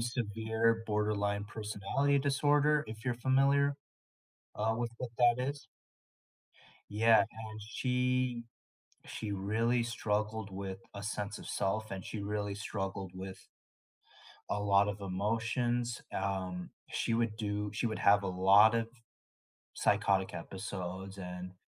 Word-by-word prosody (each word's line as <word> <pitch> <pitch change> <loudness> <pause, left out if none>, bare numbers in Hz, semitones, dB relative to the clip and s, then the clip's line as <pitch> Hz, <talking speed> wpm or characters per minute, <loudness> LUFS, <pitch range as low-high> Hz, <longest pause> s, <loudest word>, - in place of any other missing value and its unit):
severe 115 -1 0
borderline 105 -1 0
personality 110 +7 0
disorder, 145 +2 +3
if 110 +2 -8
you're 125 -2 +1
familiar, 140 +2 +4 0.8
uh, 110 +1 +1
with 120 -1 -1
what 125 - -4
that 120 0 +5
is. 140 0 -6 1.2
Yeah, 110 +2 +5
and 110 -1 -4
she 125 +1 0 0.6
she 110 -2 -4
really 110 +5 +1
struggled 110 -2 -1
with 95 0 -5 0.2
a 100 - -6
sense 105 0 -3
of - - -10
self, 105 +2 -1
and 95 -1 -5
she 105 - -5
really 105 0 -2
struggled 95 -2 -4
with 95 0 -8 1.0
a 105 - 0
lot 100 0 +4
of 100 0 -4
emotions, 115 +5 -1
um, 95 -2 -2 0.2
she - - -1
would 115 -2 0
do 105 -1 -2
she 105 - -1
would 110 - -3
have 100 0 +5
a 95 - -1
lot 100 +5 +6
of 115 - +3
f 120 0 -25 0.7
psychotic 95 -2 +2
episodes, 95 +1 -6
and 90 -1 -6
105 Hz, 125 wpm, -33 LUFS, 100-120 Hz, 1.2 s, lot